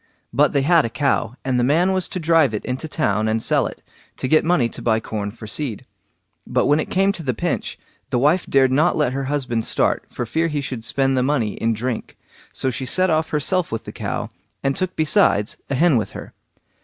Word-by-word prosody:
But 140 +3 +3
they 140 -2 +2
had 165 +1 +4
a 115 - -2
cow, 125 -3 0
and 130 -2 +1
the - - +2
man 165 +8 +3
was 185 -2 0
to 185 - -4
drive 160 -7 +3
it 105 - -5
into 130 +5 -3
town 110 -9 0
and 110 +1 +1
sell - - +1
it, - - -11 0.3
to - - -2
get 155 +4 +4
money 165 -8 +2
to - - -8
buy 110 -2 +2
corn 105 -2 -4
for 110 +1 -11
seed. 115 0 -2 0.6
But - - +1
when 145 +1 +3
it - - -3
came 195 +1 +2
to 190 - -6
the 130 -6 -2
pinch, - - -2 0.3
the - - 0
wife 150 +8 +2
dared 135 -1 +3
not 155 +6 +3
let 145 -5 +1
her 135 0 -2
husband 130 -5 -1
start - - +1
for 120 - -4
fear 160 +8 0
he 150 -2 -2
should 130 -5 -5
spend 135 +2 0
the 130 - +2
money 125 -6 0
in 115 0 0
drink, 120 +1 -4 0.3
so 130 - -1
she 130 +2 -4
set 185 +7 +3
off 160 0 +1
herself 170 +4 0
with 115 - -3
the - - -8
cow, - - -4 0.3
and 135 0 +1
took 185 0 -2
besides 155 - +2
a 140 - 0
hen 160 -1 +4
with 110 - -3
her. - - -10
135 Hz, 230 wpm, -21 LUFS, 120-160 Hz, 0.6 s, had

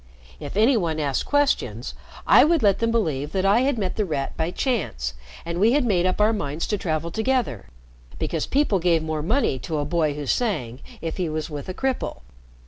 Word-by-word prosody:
If 145 +6 -6
any 230 +5 +5
one 165 -7 0
asked 140 -3 -1
questions, 285 -1 0 0.3
I - - +7
would 320 -2 +3
let 200 -2 +4
them 230 - +1
believe 155 -11 -1
that 190 -1 0
I 200 +4 +5
had 265 0 +1
met 190 -4 -2
The 215 - +2
Rat 150 -7 -3
by 160 +1 -1
chance, 170 - -2 0.3
and 170 +1 -3
we 220 +5 +4
had 285 -2 +2
made 185 -5 +2
up 185 - -1
our 215 +2 +4
minds 150 -5 -3
to 210 - +1
travel 165 -1 -2
together 230 - -1 0.5
because - - -2
people 270 -9 +2
gave 170 -2 +2
more 155 -1 -2
money 185 - +1
to 155 +4 -3
a 145 - -1
boy 155 -2 0
who 145 -1 -5
sang 135 - -1 0.2
if 165 -1 -4
he 180 -4 -1
was 155 0 -4
with 145 +3 -6
a - - -3
cripple. 265 -1 -2
175 Hz, 210 wpm, -24 LUFS, 155-225 Hz, 0.5 s, I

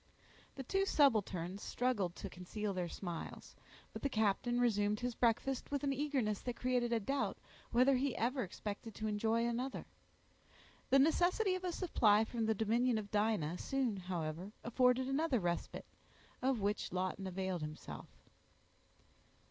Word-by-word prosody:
The 270 - -5
two 390 +9 +1
subalterns 200 - +2
struggled 210 -8 -1
to - - -6
conceal 195 +3 -4
their 180 -2 -2
smiles; 175 -3 -6 0.4
but - - -6
the 280 - 0
captain 220 +2 +1
resumed 210 -3 +2
his 245 0 -1
breakfast 240 +3 +1
with 285 -1 -2
an 275 -1 +1
eagerness 265 -7 0
that 245 -1 -3
created 245 -1 0
a 230 - +2
doubt, 275 +7 -1 0.3
whether 255 +3 +4
he 265 0 0
ever 255 +4 0
expected 205 +2 -5
to 220 - -4
enjoy 220 +2 +1
another. 245 +3 -2 1.0
The 270 - +6
necessity 350 +7 +3
of 370 0 -3
a 360 - -1
supply 225 - +3
from 225 -1 -2
the 220 - +2
dominion 230 +3 +2
of 205 -2 -5
Dinah 205 -6 +1
soon, 265 -5 0
however, 175 0 -4
afforded 250 +2 +3
another 275 -1 +1
respite, 175 -2 -2 0.6
of 255 -3 +1
which 205 +1 -1
Lawton 185 +1 -2
availed 190 -1 -2
himself. 155 0 -7
225 Hz, 150 wpm, -36 LUFS, 200-260 Hz, 1.0 s, The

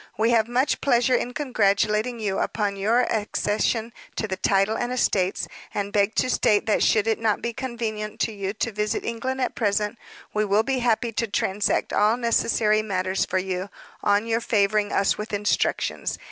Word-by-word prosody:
We 225 +3 +2
have 225 -2 +3
much 250 +4 0
pleasure 245 -1 +3
in 245 0 0
congratulating 220 -3 +1
you 205 -3 -1
upon 205 -2 -1
your 220 +5 +2
accession 220 +1 -1 0.2
to 220 - -2
the 190 - -2
title 195 +3 +2
and 245 +1 -2
estates, 195 -7 0 0.3
and 205 0 -2
beg 205 +1 +2
to - - +2
state 210 -3 +2
that 215 - +1
should 215 -1 +3
it 225 -1 0
not 220 -2 +1
be 235 - -3
convenient 225 -4 -4
to - - +1
you 200 -2 -4
to 225 +2 -2
visit 210 0 -2
England 260 +3 -3
at 250 - 0
present, 210 0 -1 0.3
we 215 - +1
will 210 +1 +2
be 265 +1 -1
happy 235 -1 +1
to 230 +1 -1
transact 200 0 0
all 215 +3 +3
necessary 225 -2 +2
matters 190 -2 -1
for - - -1
you, 185 +1 -3 0.3
on 205 +1 +2
your 230 0 0
favoring 210 -2 +1
us 195 - +1
with 215 0 -6
instructions. 205 0 0
215 Hz, 180 wpm, -24 LUFS, 205-235 Hz, 0.3 s, have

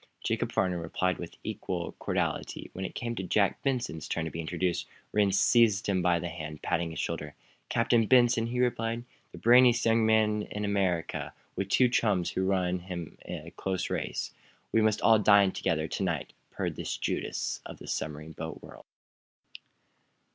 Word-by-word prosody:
Jacob - - -1
Farnum 90 -2 +1
replied 90 +2 -1
with 85 - -8
equal 85 -2 -3
cordiality. - - -2
When 95 - -4
it - - -6
came 120 -1 -3
Jack 100 -1 +1
Benson's 125 - -2
turn 85 - -2
to 80 - -4
be 85 - -4
introduced, 85 +2 -1 0.2
Rhinds 100 -2 +3
seized 115 -3 +4
him 95 -3 +1
by 90 -1 +3
the 85 +1 -3
hand, 75 -3 -7
patting 85 0 0
his 80 - -6
shoulder. - - -3 0.3
"Captain 115 -1 +3
Benson?" 120 -2 +4
he 125 +1 -2
repeated. 115 -1 0 0.3
"The - - -11
brainiest 120 0 +6
young 115 0 +4
man 110 -1 +3
in 105 0 -4
America 95 -5 -1 0.2
with 95 0 -2
two 125 +5 +5
chums 105 -7 +1
who 95 0 -1
run 90 -2 +1
him 85 -2 -7
a - - -7
close 95 -1 -2
race. - - -3 0.4
We 115 - +3
must 110 -1 +2
all 110 -1 +6
dine 100 -2 +6
together 80 -3 -1
to - - -3
night," 85 -6 -2 0.2
purred - - -3
this - - -3
Judas - - -2
of - - -9
the - - -11
submarine 75 +1 -4
boat 80 +1 -7
world. - - -12
95 Hz, 170 wpm, -29 LUFS, 85-115 Hz, 0.4 s, brainiest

